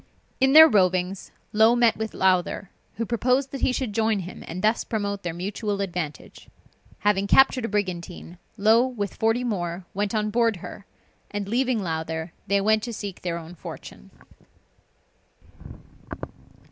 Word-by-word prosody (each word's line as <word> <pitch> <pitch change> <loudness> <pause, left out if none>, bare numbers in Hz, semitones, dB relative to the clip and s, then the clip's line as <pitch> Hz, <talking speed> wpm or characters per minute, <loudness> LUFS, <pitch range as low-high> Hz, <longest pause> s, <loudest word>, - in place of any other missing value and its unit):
In 265 +1 +3
their 315 +1 +11
rovings, 185 - +1 0.2
Low 220 +2 +5
met 240 -2 +4
with 220 0 -5
Lowther, 185 0 +1 0.2
who 230 - -2
proposed 250 +4 +1
that 275 - -6
he - - +3
should 250 -4 -3
join 220 -2 +1
him, 180 +1 -9
and 180 +3 -6
thus 220 +2 +2
promote 200 -2 -3
their 175 - -3
mutual 200 +4 -3
advantage. 175 -6 -5 0.5
Having 200 -1 +2
captured 265 +1 +4
a - - -3
brigantine, 180 -3 -4 0.2
Low, 220 +3 +5
with 205 -6 -4
forty 225 +3 +1
more, 175 -6 -3
went 205 +1 -2
on 215 0 0
board 230 -1 +2
her; 190 +2 -10 0.4
and 205 -1 -4
leaving 240 0 0
Lowther, 160 0 -4
they 200 +1 +2
went 215 +2 +2
to 235 +2 -5
seek 205 -3 -6
their 170 -2 -3
own 165 +1 -9
fortune. 110 - -10
205 Hz, 150 wpm, -24 LUFS, 180-225 Hz, 0.5 s, their